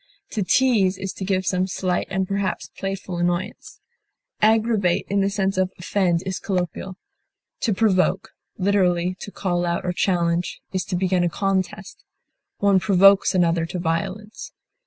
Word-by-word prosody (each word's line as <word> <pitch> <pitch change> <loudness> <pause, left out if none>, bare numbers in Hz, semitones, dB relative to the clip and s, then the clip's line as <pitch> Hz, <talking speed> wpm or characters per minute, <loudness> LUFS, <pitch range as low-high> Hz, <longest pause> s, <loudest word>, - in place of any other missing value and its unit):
To 215 - -2
tease 200 -3 +3
is 195 -1 -5
to - - -7
give 190 -1 0
some 185 0 0
slight 180 -1 -1
and 190 -1 -1
perhaps 195 -2 -2
playful 195 -2 -4
annoyance. 175 +1 -3 0.6
Aggravate 215 -4 +2
in 200 0 +2
the 195 - +2
sense 195 -1 -1
of 185 0 +1
offend 175 -1 0
is 190 -1 -3
colloquial. 185 0 -3 0.6
To 230 - 0
provoke, 190 -2 +1 0.3
literally 185 -2 +1
to - - -7
call 175 -3 -2
out 170 0 -1
or 180 - -1
challenge, 175 -1 0
is 185 -1 -1
to 185 - -3
begin 180 0 +1
a 175 - +2
contest; 195 +2 -2 0.5
one 200 -2 +3
provokes 195 +1 +5
another 170 -2 +2
to 180 - -5
violence. 185 +6 -4
190 Hz, 150 wpm, -23 LUFS, 180-195 Hz, 0.6 s, provokes